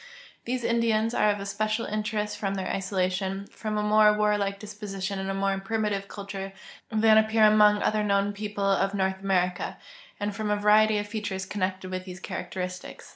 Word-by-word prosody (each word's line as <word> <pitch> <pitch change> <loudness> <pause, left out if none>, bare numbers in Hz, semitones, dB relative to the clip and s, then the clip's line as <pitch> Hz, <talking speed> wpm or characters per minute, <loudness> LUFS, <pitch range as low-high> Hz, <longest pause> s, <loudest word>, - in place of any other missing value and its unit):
These 250 0 -2
Indians 230 -1 +1
are 210 - +3
of 205 0 0
especial 215 +3 -2
interest 210 0 -2
from 195 -1 -1
tlieir 190 -1 -3
isolation, 190 0 -1
from 215 -1 -4
a 210 - 0
more 210 0 +5
warlike 205 -1 +1
disposition 200 -2 -5
and 190 0 -3
a - - -1
more 195 0 +1
primi 215 +2 -1
tive 200 0 -3
culture 195 -1 -7 0.4
than 220 0 +5
api)car 220 0 +4
among 210 -1 +5
otlier 215 0 +1
known 200 0 +1
people 205 -1 -3
of 195 0 +2
North 190 -1 0
America, 180 -2 0 0.4
and 205 0 -2
from 215 0 -3
a 210 - +3
variety 210 +1 +4
of 205 - -2
features 205 -3 -4
connected 185 -1 -3
with 185 0 -4
these 180 -1 -8
characteristics. 180 0 -6
205 Hz, 180 wpm, -27 LUFS, 195-215 Hz, 0.4 s, more